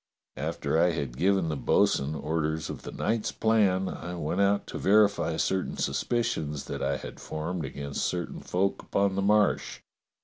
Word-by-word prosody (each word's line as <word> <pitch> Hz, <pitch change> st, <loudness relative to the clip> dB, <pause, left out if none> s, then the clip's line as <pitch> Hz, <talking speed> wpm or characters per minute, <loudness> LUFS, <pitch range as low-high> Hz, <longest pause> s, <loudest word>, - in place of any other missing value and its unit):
After 80 Hz, -, -1 dB
I 85 Hz, 0 st, +4 dB
had 70 Hz, -6 st, -3 dB
given 95 Hz, +2 st, +2 dB
the 75 Hz, -, -1 dB
bo'sun 70 Hz, +1 st, +2 dB
orders 80 Hz, +1 st, -2 dB
of -, -, -8 dB
the -, -, -7 dB
night's 110 Hz, 0 st, -1 dB
plan 100 Hz, -4 st, +2 dB
I 90 Hz, -1 st, -5 dB
went 85 Hz, +3 st, -1 dB
out 100 Hz, +1 st, +2 dB
to -, -, -6 dB
verify 105 Hz, 0 st, +3 dB
certain 95 Hz, -1 st, -1 dB
suspicions 75 Hz, -, -1 dB
that 70 Hz, -, -5 dB
I 70 Hz, 0 st, 0 dB
had 65 Hz, -, -9 dB
formed 80 Hz, +2 st, -4 dB
against 70 Hz, 0 st, -5 dB
certain 90 Hz, -1 st, -2 dB
folk 95 Hz, +2 st, -1 dB
upon 100 Hz, -1 st, +1 dB
the 100 Hz, -, 0 dB
Marsh. 105 Hz, +1 st, +2 dB
90 Hz, 165 wpm, -28 LUFS, 75-100 Hz, -, I